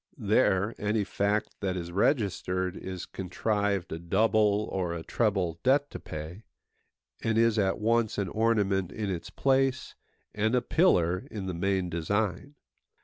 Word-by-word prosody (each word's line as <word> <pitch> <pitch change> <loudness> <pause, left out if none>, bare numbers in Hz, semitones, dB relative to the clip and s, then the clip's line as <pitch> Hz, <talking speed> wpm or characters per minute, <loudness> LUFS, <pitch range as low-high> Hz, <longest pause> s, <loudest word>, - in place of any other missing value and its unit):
There, 105 -2 +2
any 105 0 0
fact 100 +2 -1
that 95 -2 -2
is 85 -1 -5
registered 95 - 0
is 95 -2 -6
contrived 100 +1 -2
a 80 - -4
double 105 +3 +2
or 90 -3 -2
a 80 - -5
treble 95 -8 0
debt 140 +2 +2
to - - -6
pay, 80 +6 -7 0.8
and 115 -1 +1
is 115 -1 +3
at 95 -1 +1
once 115 0 +1
an 100 -2 0
ornament 100 -4 +1
in 105 -3 -3
its 85 -3 -5
place, 135 -1 +1 0.4
and 110 +3 +1
a 125 - +3
pillar 90 - +2
in 100 -3 -5
the 95 - -3
main 95 +1 0
design. 100 - -2
100 Hz, 145 wpm, -28 LUFS, 90-110 Hz, 0.8 s, is